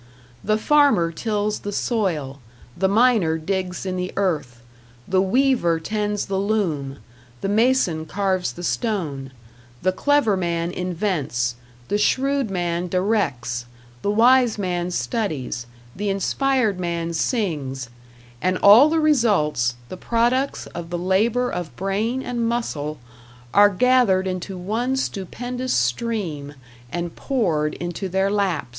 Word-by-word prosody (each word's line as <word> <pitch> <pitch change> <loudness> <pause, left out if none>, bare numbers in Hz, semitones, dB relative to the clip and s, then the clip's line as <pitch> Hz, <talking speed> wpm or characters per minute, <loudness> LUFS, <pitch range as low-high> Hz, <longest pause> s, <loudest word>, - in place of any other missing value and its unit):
The 215 +1 +2
farmer 280 - +3
tills 210 +3 -2
the 205 - -5
soil, 170 - -1 0.4
the 190 - +1
miner 210 -6 +3
digs 185 +2 -3
in 185 -1 -2
the 180 0 -3
earth, 150 -11 -1 0.4
the 185 0 +2
weaver 210 -5 +2
tends 210 +3 -2
the 195 -1 -2
loom, 170 -10 -1 0.4
the - - -1
mason 205 -7 +2
carves 190 0 -1
the 175 - -9
stone; 165 - -2 0.5
the 185 - +3
clever 265 0 +2
man 170 -2 -1
invents, 165 - -1 0.3
the 205 - 0
shrewd 270 +2 +1
man 175 -1 -1
directs, 165 - -1 0.3
the - - -1
wise 240 +2 +4
man 180 -3 -2
studies, 135 - -3 0.3
the 205 +1 -2
inspired 220 +1 +1
man 170 -1 -2
sings 150 - -2 0.5
and 185 0 +1
all 220 +11 +8
the 325 +1 +2
results, 200 - +2
the 185 - -7
products 240 +6 0
of 170 -1 -6
the 175 - -2
labor 215 +8 +1
of 175 -3 -5
brain 215 +7 -1
and 235 -2 -1
muscle, 155 -11 -2 0.6
are 205 0 +7
gathered 205 -2 +3
into 185 0 -4
one 230 +8 -1
stupendous 250 +3 -3
stream 145 - -2 0.4
and 175 -1 -4
poured 165 - 0
into 175 +3 -4
their 190 +2 +1
laps! 195 -8 0
190 Hz, 125 wpm, -22 LUFS, 170-225 Hz, 0.6 s, all